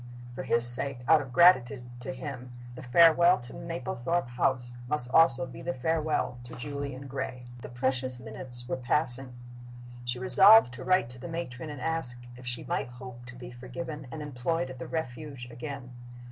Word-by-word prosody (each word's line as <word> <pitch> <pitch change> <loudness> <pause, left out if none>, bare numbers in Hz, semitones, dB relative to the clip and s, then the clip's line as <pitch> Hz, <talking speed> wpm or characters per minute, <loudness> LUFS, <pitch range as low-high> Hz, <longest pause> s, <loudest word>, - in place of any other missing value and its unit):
For 120 - -6
his 120 -2 +4
sake, 125 +1 +3
out 160 -2 +6
of 135 -3 -9
gratitude 135 -5 +4 0.2
to 130 +2 -6
him, 130 -2 -8 0.2
the 125 - -10
farewell 170 +7 +5
to 120 - -12
Mablethorpe 165 -2 -3
House 120 0 -1
must 125 -3 -1
be - - -13
also 135 -6 +5
the 130 +1 -6
farewell 155 -2 -1
to - - -10
Julian 140 +1 -6
Gray. 130 -2 -6 0.2
The - - -9
precious 130 0 -2
minutes 120 +2 +3
were - - -2
passing. 130 0 0 0.7
She 120 0 -3
resolved 125 - +6
to - - -7
write 185 -10 +2
to 125 0 -10
the 130 - -8
matron 160 -4 -6
and 145 -2 -7
ask 160 -4 -3 0.2
if 125 0 -12
she 120 0 -3
might - - -2
hope 125 0 -11
to 125 - -11
be 120 -1 -10
forgiven 130 +4 -8
and 155 +1 -7
employed 145 +1 -3
at 130 - -11
the - - -7
Refuge 140 -4 -6
again. 130 0 -8
130 Hz, 175 wpm, -28 LUFS, 125-150 Hz, 0.7 s, out